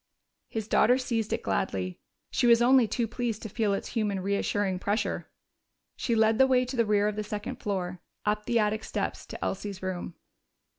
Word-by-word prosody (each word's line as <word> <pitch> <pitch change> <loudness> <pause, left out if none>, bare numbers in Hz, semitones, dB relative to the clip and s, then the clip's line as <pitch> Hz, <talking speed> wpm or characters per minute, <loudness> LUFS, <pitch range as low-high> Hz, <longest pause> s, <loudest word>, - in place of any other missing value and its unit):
His 220 -2 -4
daughter 250 +2 +4
seized 230 -4 -1
it - - -1
gladly; 95 -1 -1 0.3
she 245 - +2
was 235 -1 +7
only 250 0 +5
too 235 +1 -1
pleased 235 -2 -3
to 220 - -5
feel 215 0 0
its 195 - -2
human, 210 -4 -1
reassuring 200 0 0
pressure. 205 +3 -1 0.7
She 235 - 0
led 220 0 +3
the 265 - +7
way 255 -1 +3
to 255 +2 -5
the 230 -3 +2
rear 210 0 +3
of 210 - -1
the 215 - -1
second 210 0 -5
floor, 185 -3 -3 0.2
up 210 0 0
the 235 - +2
attic 215 0 +1
steps - - -3
to - - -5
Elsie's 195 -1 -4
room. 180 -2 -4
210 Hz, 190 wpm, -28 LUFS, 200-235 Hz, 0.7 s, was